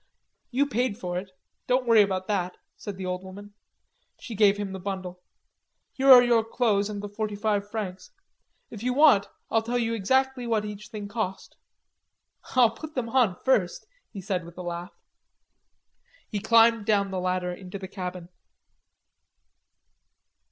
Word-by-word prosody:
"You 270 +3 +1
paid 245 -4 -1
for 180 -4 -3
it. 190 +1 -10 0.4
Don't 255 0 +2
worry 230 -2 +6
about 190 -2 0
that," 185 -3 -2 0.2
said 205 -2 -7
the 190 - -5
old 180 0 -3
woman. 200 +2 -11 0.7
She 235 - -8
gave 205 -1 +4
him 205 -2 -4
the 190 - -6
bundle. 185 -2 -6 0.7
"Here 270 0 +4
are 250 -1 +10
your 235 -2 +3
clothes 220 -3 0
and 205 -1 -5
the - - -4
forty 210 0 -4
five 205 -1 -1
francs. 205 - -5 0.6
If 215 - -9
you 250 +1 -1
want, 265 -10 +5 0.2
I'll 225 - +3
tell 235 +2 -2
you 230 -1 0
exactly 260 +4 0
what 220 -2 0
each 210 0 -8
thing 210 -2 -7
cost." 200 -2 -4 1.0
"I'll 245 -3 +6
put 305 +7 -10
them 240 -3 -2
on 230 -7 +2
first," 240 - +1 0.3
he 200 - -7
said, 185 -2 -2
with 170 +1 -13
a 180 - -6
laugh. 175 +1 -6 1.3
He 210 - -3
climbed 230 0 +4
down 200 -2 +2
the 190 - -2
ladder 180 0 -1
into 185 +1 -8
the 190 -1 -7
cabin. 180 -2 -6
205 Hz, 160 wpm, -26 LUFS, 190-230 Hz, 1.3 s, are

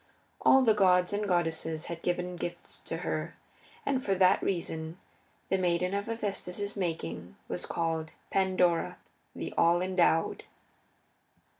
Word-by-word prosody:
All 265 0 +6
the 225 -3 +5
gods 180 -2 +4
and 205 0 -1
goddesses 165 -3 0
had 170 -1 -6
given 180 0 -1
gifts 175 0 -5
to - - -2
her, - - -2 0.5
and 265 -2 0
for 195 - +1
that 185 0 +5
reason 165 -3 -3 0.5
the 190 - +2
maiden 180 +1 +1
of 200 +1 -2
Hephaestus's 205 -3 -3
making 90 - -4
was - - -4
called 160 -1 -1 0.2
Pandora, 185 -3 +2 0.4
the - - -5
All 170 +1 +5
endowed. 180 -3 +2
180 Hz, 130 wpm, -30 LUFS, 165-195 Hz, 0.5 s, All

